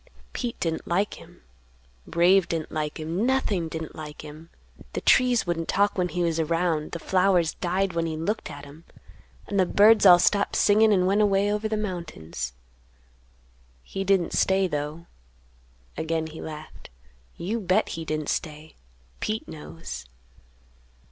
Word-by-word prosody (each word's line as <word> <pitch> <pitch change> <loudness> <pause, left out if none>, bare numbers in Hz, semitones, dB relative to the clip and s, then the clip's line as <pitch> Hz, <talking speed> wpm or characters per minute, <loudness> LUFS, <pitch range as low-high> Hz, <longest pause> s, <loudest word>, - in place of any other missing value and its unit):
Pete 240 -2 -4
didn't 165 -1 -2
like 195 +4 -1
him, - - -17 0.6
Brave 180 +2 +4
didn't 165 -2 -3
like 150 0 -3
him, 165 +6 -2
nothing 235 -9 +1
didn't 160 -1 -6
like 150 -1 -8
him, 155 +2 -11 0.4
the - - -3
trees 250 -3 +4
wouldn't 165 -2 -2
talk 200 +1 +2
when 180 -2 +1
he 175 0 -1
was 165 -1 0
around, 165 -1 0
the - - -2
flowers 180 -1 +2
died 185 +1 -1
when 165 0 -1
he 160 -1 -4
looked 205 +8 -2
at 145 0 -9
'em, 145 +3 -14 0.6
and 200 - -1
the 185 - +5
birds 215 +4 +5
all 180 -3 +9
stopped 200 +3 +2
singin' 215 +1 +4
and 185 -3 +3
went 200 +3 +3
away 200 0 +2
over 210 +1 -1
the 215 - -1
mountains. 160 - -5 1.3
He 195 - -4
didn't 195 -3 +1
stay, 190 0 +3
though." 150 0 -4 0.9
Again 160 0 -2
he 160 0 -9
laughed. 155 0 -9 0.5
"You 210 +7 -2
bet 195 +1 +1
he 165 - -5
didn't 155 -1 -3
stay! 155 0 -4 0.5
Pete 215 +1 -3
knows." 150 - -8
175 Hz, 155 wpm, -25 LUFS, 160-195 Hz, 1.3 s, all